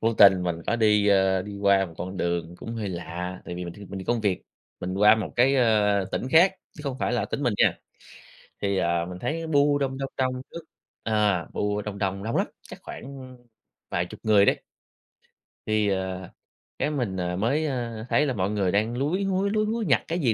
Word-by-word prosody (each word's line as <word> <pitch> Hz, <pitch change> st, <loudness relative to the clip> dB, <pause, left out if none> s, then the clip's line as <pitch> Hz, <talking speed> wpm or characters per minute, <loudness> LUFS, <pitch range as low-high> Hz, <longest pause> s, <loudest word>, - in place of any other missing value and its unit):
vô 115 Hz, 0 st, +1 dB
tình 95 Hz, -3 st, +7 dB
mình 85 Hz, -2 st, -1 dB
có 120 Hz, -, +1 dB
đi, 105 Hz, -2 st, +4 dB
ơ, 95 Hz, -1 st, +3 dB
đi 100 Hz, 0 st, -8 dB
qua 100 Hz, -1 st, +3 dB
một 85 Hz, -, -13 dB
con 95 Hz, +2 st, -5 dB
đường 85 Hz, -1 st, -2 dB
cũng 115 Hz, -, -7 dB
hơi 105 Hz, -3 st, -3 dB
lạ, 90 Hz, +1 st, -5 dB
tại 90 Hz, -, -6 dB
vì 90 Hz, 0 st, -5 dB
mình 85 Hz, -, -7 dB
th -, -, -14 dB
mình 100 Hz, -1 st, -8 dB
đi 95 Hz, -, -7 dB
công 120 Hz, +1 st, 0 dB
việc, 100 Hz, -4 st, 0 dB, 0.4 s
mình 90 Hz, +1 st, -3 dB
qua 105 Hz, +3 st, +6 dB
một 110 Hz, -, -4 dB
cái, 130 Hz, +3 st, +4 dB
ơ, 105 Hz, -5 st, +3 dB
tỉnh 130 Hz, -, -2 dB
khác, 180 Hz, +4 st, +7 dB, 0.2 s
chứ -, -, -12 dB
không 135 Hz, -2 st, -3 dB
phải -, -, -1 dB
là 120 Hz, -, +1 dB
tỉnh 145 Hz, -, -4 dB
mình 120 Hz, -5 st, +1 dB
nha, -, -, +3 dB, 0.8 s
thì, 100 Hz, -1 st, 0 dB
ờ, 85 Hz, -2 st, +1 dB
mình 90 Hz, 0 st, -8 dB
thấy 165 Hz, -, -3 dB
bu 145 Hz, -1 st, +3 dB
đông, 135 Hz, -2 st, -1 dB
đông, 135 Hz, 0 st, -3 dB
đông 130 Hz, -1 st, 0 dB
trước 170 Hz, -, -6 dB, 0.4 s
à, 105 Hz, -5 st, +1 dB
bu 105 Hz, 0 st, -1 dB
đông 105 Hz, -1 st, -6 dB
đông, 100 Hz, -1 st, -2 dB
đông 115 Hz, -, -2 dB
lắm, -, -, +1 dB
chắc -, -, -12 dB
khoảng, -, -, -8 dB
ưm, 130 Hz, -2 st, -10 dB, 0.5 s
vài 85 Hz, -, 0 dB
chục -, -, -11 dB
người 105 Hz, -2 st, +5 dB
đấy. -, -, +2 dB, 1.1 s
Thì, 110 Hz, -1 st, +2 dB
ờ, 95 Hz, -1 st, -3 dB, 0.5 s
cái -, -, +1 dB
mình, 120 Hz, -10 st, -2 dB
ờ, 90 Hz, -1 st, -2 dB
mới, 135 Hz, -, +1 dB
ơ, 120 Hz, -5 st, -3 dB
thấy 150 Hz, -, +3 dB
là 135 Hz, -, 0 dB
mọi 95 Hz, -3 st, -1 dB
người 100 Hz, -3 st, +1 dB
đang 110 Hz, +5 st, 0 dB
lúi 160 Hz, +9 st, 0 dB
húi, 195 Hz, +1 st, +1 dB
lúi 215 Hz, +1 st, +1 dB
húi 225 Hz, +1 st, -1 dB
nhặt 135 Hz, -, +3 dB
cái 170 Hz, +2 st, -1 dB
gì 125 Hz, -8 st, +2 dB
105 Hz, 225 wpm, -26 LUFS, 95-130 Hz, 1.1 s, tình